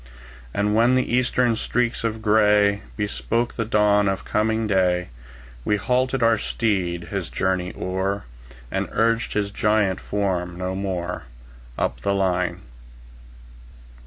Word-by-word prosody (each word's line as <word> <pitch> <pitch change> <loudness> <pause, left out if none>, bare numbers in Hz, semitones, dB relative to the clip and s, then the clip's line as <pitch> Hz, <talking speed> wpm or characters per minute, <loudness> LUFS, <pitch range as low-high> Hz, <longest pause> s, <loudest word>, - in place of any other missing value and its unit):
And 105 +7 0
when 120 +4 +4
the 130 -2 0
Eastern 125 -1 +2
streaks 120 +1 -1
of 110 -1 -2
gray 105 -1 +4 0.2
Bespoke 115 +3 -1
the 115 - -1
dawn 105 -2 +3
of 95 0 -3
coming 110 +1 +1
day, 90 -4 +1 0.5
We 105 - +2
halted 130 +3 0
our 115 -2 +4
steed, 90 -9 -1
his - - -3
journey 95 -1 -1
o'er, 95 +2 -2 0.5
And - - -2
urged 115 +1 +1
his 100 -1 -1
giant 105 -2 +1
form 90 -4 -2
no 90 0 -3
more, 90 -2 -3 0.5
Up - - -1
the 100 0 0
line. 90 -2 0
105 Hz, 130 wpm, -23 LUFS, 95-115 Hz, 0.5 s, when